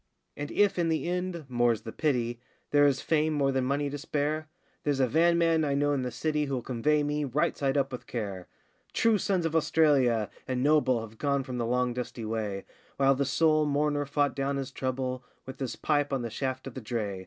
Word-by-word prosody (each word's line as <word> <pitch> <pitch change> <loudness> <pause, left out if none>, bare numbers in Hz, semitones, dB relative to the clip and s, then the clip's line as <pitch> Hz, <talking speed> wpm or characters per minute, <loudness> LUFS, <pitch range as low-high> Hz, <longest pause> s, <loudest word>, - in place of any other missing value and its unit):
And 145 0 -5
if, 205 -3 +2
in 170 -1 +2
the 160 +1 0
end 180 -2 -2
more's 120 -3 +1
the 110 - -7
pity 120 -6 -1 0.3
There 145 0 +6
is 135 -2 +1
fame 155 -1 +2
more 140 -2 +2
than 130 -1 0
money 140 +2 0
to 145 +1 -5
spare 155 +1 -2 0.3
There's 145 -2 0
a 130 - +5
van 170 +7 +3
man 165 -1 +3
I 140 -2 0
know 145 +1 +2
in 140 - 0
the 125 - -2
city 150 +5 -1
Who'll 135 -4 -3
convey 145 +5 +1
me, 150 0 -1
right 140 +2 0
side 140 0 0
up 135 -1 +1
with 125 - -7
care. 100 -6 -4 0.5
True 225 -2 +3
sons 185 -4 0
of 165 0 -1
Australia, 140 -9 +3 0.2
and 130 -1 -1
noble, 145 -5 +3
Have 110 0 -10
gone 140 -2 +1
from 125 -1 -5
the 115 - -1
long 125 0 +1
dusty 120 -2 -5
way, 110 -3 -3 0.3
While 135 0 +4
the 140 +1 0
sole 155 +2 +3
mourner 145 0 0
fought 145 -2 +1
down 140 0 -1
his 135 -1 -4
trouble 130 -1 -3 0.2
With 130 - -9
his 130 -3 -3
pipe 145 -2 0
on 135 -3 -1
the 115 - -4
shaft 130 +2 -3
of 135 - -7
the 130 - -6
dray. 105 -4 -3
140 Hz, 220 wpm, -28 LUFS, 125-150 Hz, 0.5 s, There